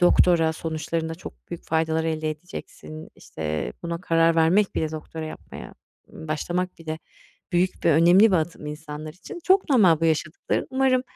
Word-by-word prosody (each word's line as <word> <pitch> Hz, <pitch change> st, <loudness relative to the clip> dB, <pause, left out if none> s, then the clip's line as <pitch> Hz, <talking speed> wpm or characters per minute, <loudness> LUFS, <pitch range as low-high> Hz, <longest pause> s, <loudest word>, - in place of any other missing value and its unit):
Doktora, 175 Hz, -2 st, +4 dB
sonuçlarında 160 Hz, 0 st, -3 dB
çok 175 Hz, -, -12 dB
büyük 170 Hz, -, -6 dB
faydalar 160 Hz, 0 st, 0 dB
elde 155 Hz, -1 st, -1 dB
edeceksin. 155 Hz, -1 st, -9 dB
İşte, 75 Hz, -5 st, -4 dB
buna 170 Hz, 0 st, -4 dB
karar 165 Hz, -2 st, +3 dB
vermek 180 Hz, +5 st, +3 dB
bile 155 Hz, -, -1 dB
doktora 160 Hz, +1 st, -6 dB
yapmaya, 155 Hz, -, -10 dB, 0.3 s
mmm, 160 Hz, -, -11 dB
başlamak 175 Hz, +4 st, -2 dB
bile 160 Hz, -1 st, -5 dB, 0.5 s
büyük 180 Hz, +1 st, 0 dB
ve 165 Hz, -, +5 dB
önemli 175 Hz, +7 st, +6 dB
bir -, -, +5 dB
adım 160 Hz, -1 st, -3 dB
insanlar 150 Hz, 0 st, -7 dB
için. 185 Hz, -, -10 dB
Çok 380 Hz, -4 st, +3 dB
normal 185 Hz, -, +5 dB
bu -, -, +1 dB
yaşadıkların, 155 Hz, 0 st, 0 dB
umarım 260 Hz, -1 st, +2 dB
165 Hz, 155 wpm, -24 LUFS, 155-180 Hz, 0.5 s, önemli